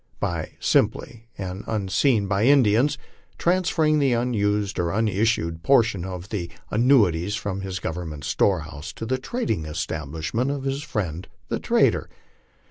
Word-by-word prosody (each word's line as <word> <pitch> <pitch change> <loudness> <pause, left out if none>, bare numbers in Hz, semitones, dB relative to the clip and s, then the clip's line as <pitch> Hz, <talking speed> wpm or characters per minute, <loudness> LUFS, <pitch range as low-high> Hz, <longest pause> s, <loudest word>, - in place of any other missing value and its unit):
By - - -3
simply, 115 0 0
and 95 0 -5
unseen 105 +2 +1
by 100 0 0
the - - +5
Indians, 135 +1 +4 0.4
transferring 165 -4 +2
the 135 -3 +3
unissued 105 -4 0
portion 115 -5 +3
of 90 0 -7
the 90 -6 -3 0.2
annuities 105 -7 +3
from 100 -3 -3
his 95 -1 -4
government 80 -4 -5
storehouse 80 -4 -1
to - - -6
the 130 +3 -1
trading 130 - -2
establishment 80 - -3
of 140 -1 -3
his 135 +1 -2
friend 95 - -4 0.2
the - - -1
trader. - - +2
105 Hz, 125 wpm, -24 LUFS, 85-125 Hz, 0.4 s, the